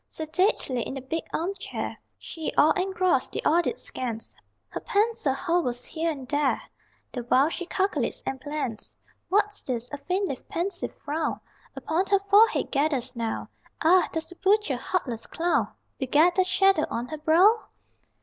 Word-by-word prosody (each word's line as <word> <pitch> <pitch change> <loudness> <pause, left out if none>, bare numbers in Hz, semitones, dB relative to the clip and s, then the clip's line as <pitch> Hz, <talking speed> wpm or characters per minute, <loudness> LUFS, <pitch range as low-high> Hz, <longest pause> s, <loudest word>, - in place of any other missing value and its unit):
Sedately, 315 - 0
in 265 - -4
the 270 - -5
big 320 +6 -3
armchair, 370 +5 -3 0.2
She, 320 -3 -5
all 310 - +6
engrossed, 370 -6 +1
the - - -2
audit 345 +9 +2
scans 230 -3 -4 0.4
Her - - -5
pencil 420 -8 +1
hovers 310 -7 0
here 330 +1 -2
and 270 -4 -7
there 290 0 +1 0.5
The 245 - -4
while 265 +5 +4
she 355 +1 -5
calculates 400 +6 -1
and 265 -1 -4
plans; 285 -6 -4 0.3
What's 415 +1 +1
this? 245 -2 -3
A 285 - -4
faintly 360 0 -1
pensive 360 +4 -2
frown 305 +3 -1 0.4
Upon 360 +4 -1
her 400 - +4
forehead 400 +3 +4
gathers 280 -4 0
now 230 -1 -3 0.3
Ah, 360 +3 +5
does 320 0 -2
the 355 - -11
butcher 395 -7 +2
heartless 250 -5 -2
clown 345 +1 0 0.3
Beget 300 +6 +4
that 370 0 +2
shadow 390 -4 +3
on 240 +2 -3
her 310 - -5
brow? 370 +9 +4
320 Hz, 150 wpm, -26 LUFS, 270-375 Hz, 0.5 s, all